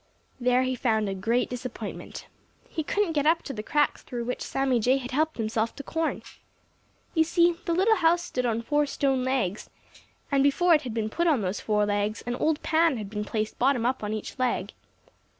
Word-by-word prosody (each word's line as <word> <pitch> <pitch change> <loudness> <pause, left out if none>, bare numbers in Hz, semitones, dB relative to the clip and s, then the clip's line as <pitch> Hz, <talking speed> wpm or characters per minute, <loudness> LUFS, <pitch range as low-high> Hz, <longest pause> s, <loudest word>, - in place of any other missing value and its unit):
There 250 +1 +3
he 260 0 0
found 220 -4 +1
a 195 - -2
great 225 +6 0
disappointment. 245 -4 -7 0.4
He 320 - -3
couldn't 405 +3 0
get 295 -2 +1
up 330 +1 +3
to 275 - -5
the 210 - -4
cracks 295 +6 +1
through 240 -2 -5
which 250 +1 -4
Sammy 270 -3 0
Jay 255 +4 +3
had 250 -1 -6
helped 310 +4 0
himself 220 0 -1
to 280 - -7
corn. 325 +3 -2 0.9
You 320 - +4
see, 340 +1 +3
the 340 - 0
little 425 +5 +4
house 340 0 +3
stood 250 -6 -2
on 230 0 -1
four 295 +3 +1
stone 270 -2 0
legs, 250 -7 -1 0.6
and 275 -1 +3
before 335 +6 +4
it 305 - +4
had 245 -5 -6
been 220 -1 -1
put 340 +6 0
on 295 -8 +3
those 185 +2 -2
four 210 -1 +1
legs, 205 +1 -1
an 240 - -2
old 315 -1 0
pan 320 -3 +3
had 210 -2 -6
been 210 -1 -3
placed 215 0 -3
bottom 250 -2 +2
up 255 -2 0
on 210 - -2
each 215 +4 -5
leg. 255 -1 -1
255 Hz, 205 wpm, -27 LUFS, 220-305 Hz, 0.9 s, You